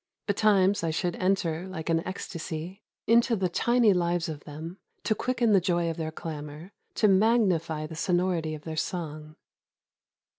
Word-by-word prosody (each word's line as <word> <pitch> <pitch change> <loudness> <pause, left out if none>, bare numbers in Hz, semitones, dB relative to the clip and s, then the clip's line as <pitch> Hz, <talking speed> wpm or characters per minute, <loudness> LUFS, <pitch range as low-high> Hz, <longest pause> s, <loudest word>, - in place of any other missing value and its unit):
Betimes 205 -2 +3
I 165 - +1
should 170 +2 -1
enter, 185 -2 0
like 165 -4 -6
an 165 -1 +2
ecstasy, 175 0 -6 0.2
into 235 +1 +4
the 190 -3 0
tiny 235 +3 +3
lives 175 -1 0
of 150 -2 -7
them, 160 +5 -8 0.2
to 220 - +2
quicken 240 0 0
the 195 -2 +5
joy 170 -1 +1
of 165 - -7
their 160 -1 -3
clamor, 155 +2 -7 0.2
to 215 - +4
magnify 190 -7 +2
the 160 - -8
sonority 175 -2 0
of 150 - -11
their 160 -1 -5
song. 155 -2 -4
175 Hz, 155 wpm, -27 LUFS, 160-195 Hz, 0.2 s, the